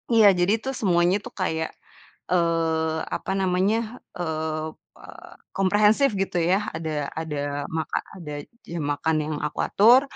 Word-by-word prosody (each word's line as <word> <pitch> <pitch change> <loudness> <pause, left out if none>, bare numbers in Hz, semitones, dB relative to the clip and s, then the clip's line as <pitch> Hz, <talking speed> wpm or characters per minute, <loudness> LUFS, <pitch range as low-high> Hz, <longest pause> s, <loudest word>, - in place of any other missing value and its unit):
iya, 215 -2 +8
jadi 180 +5 +3
itu 265 +4 -3
semuanya 180 -3 +3
tuh, - - -9
kayak, 160 -4 -1 0.6
eee, 165 -2 +1 0.2
apa - - -3
namanya, 200 +6 0 0.2
eee, 160 -2 -2 0.8
komprehensif, 210 +7 +3
gitu 190 -2 -1
ya, 190 +5 +2
ada 155 -3 -2
ada 145 -2 -3
maka 160 0 -2 0.2
ada 150 -4 -6 0.3
jam 170 -1 -4
makan 150 +2 0
yang 155 0 -3
aku 150 - -5
atur, 235 +6 +6
170 Hz, 130 wpm, -25 LUFS, 160-195 Hz, 0.8 s, iya